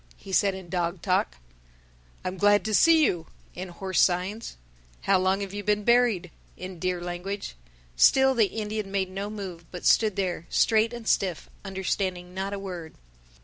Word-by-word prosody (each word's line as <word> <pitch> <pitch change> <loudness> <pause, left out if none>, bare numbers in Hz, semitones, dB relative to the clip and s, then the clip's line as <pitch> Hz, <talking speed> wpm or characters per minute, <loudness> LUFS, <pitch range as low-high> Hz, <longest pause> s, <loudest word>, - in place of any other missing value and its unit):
he 195 - -11
said 195 0 +3
in 190 -2 -9
dog 175 0 -2
talk; 180 - +1 0.9
"I - - 0
am 185 - -8
glad 205 +1 +4
to 215 - -1
see 320 +6 +6
you," 170 -7 -1 0.3
in 185 +1 -6
horse 190 +2 -1
signs; 185 - 0 0.4
"How 195 -1 +3
long 190 +2 +1
have 200 -1 -5
you 205 0 -5
been 210 0 +1
buried?" 235 -7 +3 0.3
in 185 -1 -8
deer 185 0 -1
language. 175 +3 -5 0.4
Still 265 - +5
the 225 -5 +3
Indian 215 -1 -4
made 190 -2 -1
no 195 +2 -4
move 190 -5 -7
but 180 - -8
stood 215 -4 +4
there, 180 -3 -2
straight 225 +1 +3
and 235 -2 -8
stiff, 180 -6 0
understanding 190 -2 -3
not 190 +1 -3
a 200 - -3
word. 180 -5 -7
195 Hz, 175 wpm, -26 LUFS, 180-210 Hz, 0.9 s, see